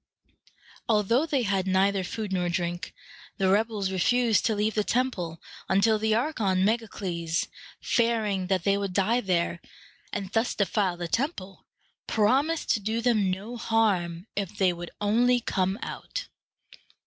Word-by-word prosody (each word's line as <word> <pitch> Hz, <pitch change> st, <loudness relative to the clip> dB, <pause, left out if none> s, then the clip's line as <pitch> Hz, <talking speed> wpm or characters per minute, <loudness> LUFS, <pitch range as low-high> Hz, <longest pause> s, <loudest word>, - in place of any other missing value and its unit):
Although 230 Hz, +7 st, +3 dB
they 275 Hz, -5 st, +1 dB
had 195 Hz, -3 st, 0 dB
neither 190 Hz, +1 st, +2 dB
food 210 Hz, +1 st, -4 dB
nor 180 Hz, -1 st, 0 dB
drink, 175 Hz, +2 st, -2 dB, 0.5 s
the 190 Hz, -1 st, +2 dB
rebels 205 Hz, -1 st, +1 dB
refused 225 Hz, +2 st, +2 dB
to 220 Hz, -, +1 dB
leave 210 Hz, +1 st, 0 dB
the 210 Hz, -, +1 dB
temple, 200 Hz, -10 st, -1 dB, 0.3 s
until 205 Hz, +3 st, +3 dB
the 220 Hz, 0 st, +2 dB
archon 220 Hz, -8 st, +1 dB
Meg´a 225 Hz, +1 st, +1 dB
cles, 170 Hz, -5 st, -2 dB, 0.3 s
fearing 220 Hz, -5 st, +1 dB
that 185 Hz, -2 st, 0 dB
they 200 Hz, +1 st, +2 dB
would 200 Hz, -2 st, -3 dB
die 215 Hz, +6 st, +2 dB
there, 175 Hz, -3 st, 0 dB, 0.5 s
and 200 Hz, -2 st, -4 dB
thus 225 Hz, +3 st, 0 dB
defile 195 Hz, -2 st, 0 dB
the 175 Hz, -1 st, -4 dB
temple, 200 Hz, -, -3 dB, 0.4 s
promised 270 Hz, +9 st, +2 dB
to -, -, +2 dB
do 220 Hz, +3 st, -2 dB
them 225 Hz, -5 st, +2 dB
no 205 Hz, +6 st, -4 dB
harm 190 Hz, -7 st, 0 dB
if 200 Hz, 0 st, -3 dB
they 190 Hz, -3 st, +3 dB
would 175 Hz, 0 st, -7 dB
only 240 Hz, +4 st, +3 dB
come 190 Hz, -3 st, -1 dB
out. -, -, -6 dB
205 Hz, 150 wpm, -27 LUFS, 185-225 Hz, 0.5 s, Although